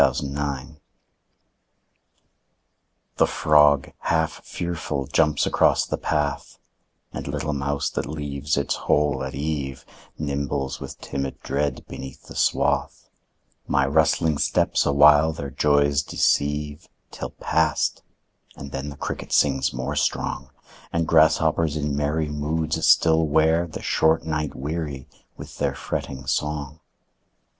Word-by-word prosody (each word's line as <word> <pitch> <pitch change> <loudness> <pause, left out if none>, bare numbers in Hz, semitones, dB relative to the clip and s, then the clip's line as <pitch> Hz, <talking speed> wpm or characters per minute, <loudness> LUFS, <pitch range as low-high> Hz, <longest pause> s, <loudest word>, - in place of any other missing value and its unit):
Summer 70 0 +2 0.3
Evening 80 +3 -15 2.4
The - - +4
frog 75 -2 +4
half 80 -2 -1
fearful 80 -5 -4
jumps 75 +1 +2
across - - +3
the - - -3
path, 75 -1 -2 0.6
And - - -6
little 75 +1 -2
mouse 70 +1 -1
that - - -3
leaves 75 -1 -3
its 70 0 0
hole 75 -3 +1
at 65 - -5
eve 70 -3 -3 0.3
Nimbles 70 -2 -2
with - - -8
timid 70 -1 -4
dread 70 0 -2
beneath 65 -1 -9
the - - -12
swath; - - 0 0.6
My 70 - +2
rustling 80 +1 +2
steps - - +1
awhile 75 +2 +6
their 70 -3 -6
joys 70 0 +2
deceive, 75 +3 0 0.2
Till - - -6
past, - - 0 0.5
and 70 0 -9
then 70 +2 -4
the 70 - -9
cricket - - -5
sings 65 -2 +2
more 65 +1 -4
strong, 65 0 -1 0.4
And 85 -1 0
grasshoppers 80 0 +3
in 75 -1 -1
merry 75 +2 0
moods 80 +2 -2
still 80 -1 +5
wear 80 +3 +3
The 80 - -8
short 80 0 +2
night 75 -2 -2
weary 75 -2 -4 0.3
with - - -10
their 70 -1 0
fretting 65 -1 -5
song. 75 0 -2
75 Hz, 125 wpm, -24 LUFS, 70-80 Hz, 2.4 s, awhile